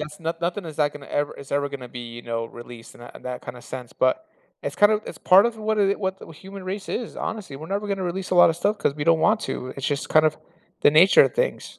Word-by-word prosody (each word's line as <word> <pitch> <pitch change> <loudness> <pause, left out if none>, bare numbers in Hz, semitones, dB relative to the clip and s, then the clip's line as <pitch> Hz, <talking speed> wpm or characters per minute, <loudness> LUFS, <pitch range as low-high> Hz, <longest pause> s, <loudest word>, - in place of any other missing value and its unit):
that's 150 0 -7
not 165 0 -4
nothing 175 +3 -2
is 155 -3 -8
that 145 -1 +1
gonna 145 -2 -11
ever 145 0 -2
is 140 - -10
ever 140 0 +1
gonna 135 -3 -8
be, 120 0 -8
you 120 - -9
know, 115 -1 -3
released 120 -1 -12
in - - -16
that 120 - -12
in - - -12
that 125 -1 -6
kinda 120 0 -8
sense, 125 -2 -8
but 130 - +1 0.4
it's, - - -4
kind 205 +1 +6
of 210 - +1
it's - - -7
part 195 +5 +6
of 235 -1 -3
what 215 0 -1
it 200 0 +2
what 190 -1 -2
the - - -12
human 190 +4 -10
race 195 +1 -5
is, 235 - -4
honestly, 205 -10 -5
we're 155 +3 -9
never 200 +1 -2
gonna 195 -1 -2
release 185 +1 -3
a - - +1
lotta 170 -2 +6
stuff 205 +5 0
'cause 140 - 0
we 145 0 -3
don't 165 -1 +4
want 215 +4 +3
to, 130 - -4
it's 135 - -3
just, 145 -1 -2
kind 155 0 +5
of 155 0 0 0.5
the - - +7
nature 170 +6 +7
of - - -2
things. - - -2
165 Hz, 280 wpm, -24 LUFS, 140-195 Hz, 0.5 s, the